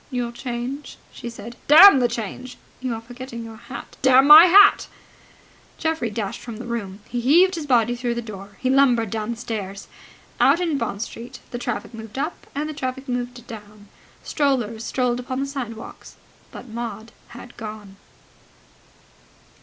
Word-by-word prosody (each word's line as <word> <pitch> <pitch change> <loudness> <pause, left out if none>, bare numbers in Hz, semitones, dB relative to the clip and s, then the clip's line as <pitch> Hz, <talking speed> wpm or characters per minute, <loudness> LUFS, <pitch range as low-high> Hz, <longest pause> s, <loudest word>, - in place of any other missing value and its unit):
"Your 245 -3 -3
change?" 245 +3 -6
she 235 - -8
said. 230 +1 -10
"Damn 320 +2 +9
the 245 - +3
change!" 240 +2 -6 0.2
"You 255 -2 -3
are 225 - -7
forgetting 240 0 -9
your 225 -1 -10
hat." 255 - -10
"Damn 265 0 +6
my 305 +4 +11
hat!" 395 +3 +6 0.9
Geoffrey 320 -7 -1
dashed 210 -2 -5
from 230 -3 -8
the 240 - -8
room. 210 -4 -5
He 240 0 -3
heaved 345 +9 +4
his 320 -4 -5
body 240 -2 +2
through 240 -1 -2
the 235 - -3
door. 200 -2 -10
He 255 - 0
lumbered 245 -6 +3
down 220 -1 -3
the 235 - -3
stairs. 200 -4 -6 0.5
Out 285 +5 +4
in 330 -6 -1
Bond 215 -2 -3
Street 245 +3 -9
the 240 - -5
traffic 240 - -4
moved 220 +1 -10
up 300 +5 -4
and 295 +2 -2
the 310 - -5
traffic 265 -1 -5
moved 245 -1 -4
down. 210 -2 -12 0.3
Strollers 240 -7 -1
strolled 245 0 -1
upon 255 +1 -4
the 275 - -1
sidewalks. 245 -5 -8 0.4
But 250 - -10
Maud 225 -1 -7 0.3
had 245 0 -12
gone. 210 -3 -9
240 Hz, 165 wpm, -22 LUFS, 225-265 Hz, 0.9 s, my